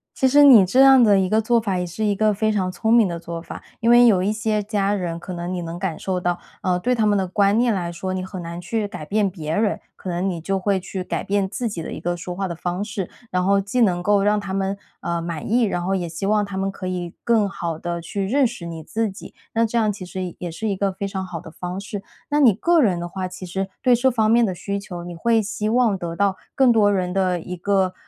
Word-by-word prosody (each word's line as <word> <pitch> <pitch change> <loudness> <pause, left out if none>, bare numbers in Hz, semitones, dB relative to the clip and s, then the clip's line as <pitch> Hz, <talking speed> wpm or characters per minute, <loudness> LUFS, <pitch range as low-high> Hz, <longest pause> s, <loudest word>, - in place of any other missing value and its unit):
其 265 - +2
实 290 +3 +6
你 245 -9 +8
这 250 +9 +3
样 270 -1 +8
的 205 -4 +5
一 190 - +1
个 215 +3 +3
做 235 +1 +2
法， 195 -4 -1
也 180 - -2
是 215 +6 -4
一 205 -1 +2
个 215 +1 +2
非 215 +2 +1
常 190 -3 0
聪 220 +4 -1
明 230 -3 +6
的 170 -1 -4
做 170 0 -6
法。 165 - -9 0.2
因 230 - +1
为 240 0 +7
有 190 -5 +4
一 200 +3 +1
些 215 -1 -1
家 200 -1 0
人， 175 -4 -3
可 175 +2 -8
能 175 +1 -4
你 180 -1 -3
能 170 +1 -6
感 175 -4 -3
受 185 -2 -2
到， 175 0 -1 0.2
呃， 180 -1 +1
对 250 +8 +1
他 220 -3 +1
们 205 - +3
的 190 -1 0
观 200 +3 +2
念 240 -1 +3
来 175 -4 -2
说， 185 +2 -4
你 185 - -2
很 190 -1 -7
难 170 +1 -6
去 210 +4 -2
改 155 -6 -8
变 205 0 +1
别 160 -3 -4
人， 210 -1 +1 0.2
可 185 - -6
能 175 +2 -1
你 175 -3 -3
就 195 +4 -1
会 195 +1 +1
去 185 +1 -5
改 - - -3
变 200 -1 0
自 235 +4 -3
己 175 -5 -5
的 - - -6
一 - - -6
个 175 0 -2
说 175 +1 -6
话 195 +2 -2
的 170 - -4
方 175 +3 -3
式。 200 -4 -4 0.2
然 180 0 0
后 200 +1 +3
既 200 +6 -2
能 180 -5 +2
够 205 +1 +3
让 210 +1 +3
他 200 -2 -5
们， 195 +1 -1 0.2
呃， 170 -1 -2
满 165 +1 -5
意， 240 +2 +3
然 185 -5 0
后 190 +2 0
也 180 -2 -1
希 165 +4 -4
望 210 0 +2
他 200 -1 -7
们 195 0 -1
可 190 -1 -7
以 180 -2 -4
更 225 -4 +3
好 170 -4 -4
地 170 +1 -4
去 195 +3 -3
认 265 +6 +3
识 230 -7 -6
你 165 -1 -6
自 220 +7 -1
己。 190 - -11 0.2
那 230 0 +3
这 230 +1 0
样 215 -2 +2
其 195 -2 -8
实 180 -1 -5
也 175 - -5
是 220 +7 -4
一 195 - -1
个 195 0 0
非 200 +1 -4
常 190 -1 -4
好 175 -3 -6
的 160 - -11
方 180 +3 -5
式。 205 -1 -6 0.3
那 295 - +2
你 250 -6 +7
个 335 - +3
人 190 -8 +2
的 175 - -4
话， 185 +1 -4
其 185 0 -9
实 190 +2 -3
对 250 -2 +4
这 255 +2 +3
方 220 -3 +2
面 235 +1 +5
的 190 -4 -1
需 200 +3 -4
求， 180 -4 -7
你 175 0 -7
会 225 +7 +2
希 210 0 -3
望 235 -3 +3
得 170 -2 -5
到 200 -1 +1 0.2
更 265 -2 +4
多 210 -3 +4
人 180 -2 -1
的 185 -2 +1
一 180 +2 -6
个， 190 0 +1
195 Hz, 300 characters per minute, -22 LUFS, 180-215 Hz, 0.3 s, 你